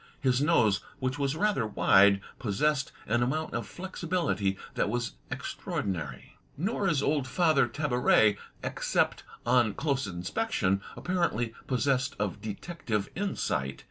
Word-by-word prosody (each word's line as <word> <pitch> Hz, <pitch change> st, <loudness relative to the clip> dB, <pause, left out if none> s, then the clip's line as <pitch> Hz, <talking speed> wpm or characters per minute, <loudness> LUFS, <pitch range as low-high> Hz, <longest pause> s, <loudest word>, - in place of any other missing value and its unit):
His 130 Hz, -1 st, +2 dB
nose, 110 Hz, -11 st, +3 dB, 0.2 s
which 130 Hz, +1 st, -2 dB
was 140 Hz, +1 st, 0 dB
rather 165 Hz, -, +1 dB
wide, 100 Hz, -1 st, +5 dB, 0.2 s
possessed 135 Hz, +6 st, 0 dB
an 120 Hz, +3 st, +1 dB
amount 155 Hz, +6 st, -1 dB
of -, -, -3 dB
flexibility 170 Hz, -, -1 dB, 0.2 s
that -, -, 0 dB
was 120 Hz, +2 st, -1 dB, 0.2 s
extraordinary. 80 Hz, -10 st, -4 dB, 0.2 s
Nor 195 Hz, -, 0 dB
is 150 Hz, -6 st, +2 dB
old 145 Hz, -3 st, +1 dB
Father 155 Hz, -2 st, +3 dB
Tabaret, 125 Hz, -5 st, +3 dB, 0.3 s
except -, -, 0 dB, 0.2 s
on 120 Hz, -4 st, +3 dB
close 140 Hz, -5 st, 0 dB
inspection, 95 Hz, -, -1 dB
apparently 170 Hz, -11 st, 0 dB
possessed 135 Hz, +1 st, +1 dB
of 100 Hz, -2 st, -2 dB
detective 110 Hz, -, -3 dB
insight. 80 Hz, -, -2 dB
125 Hz, 120 wpm, -29 LUFS, 105-155 Hz, 0.3 s, wide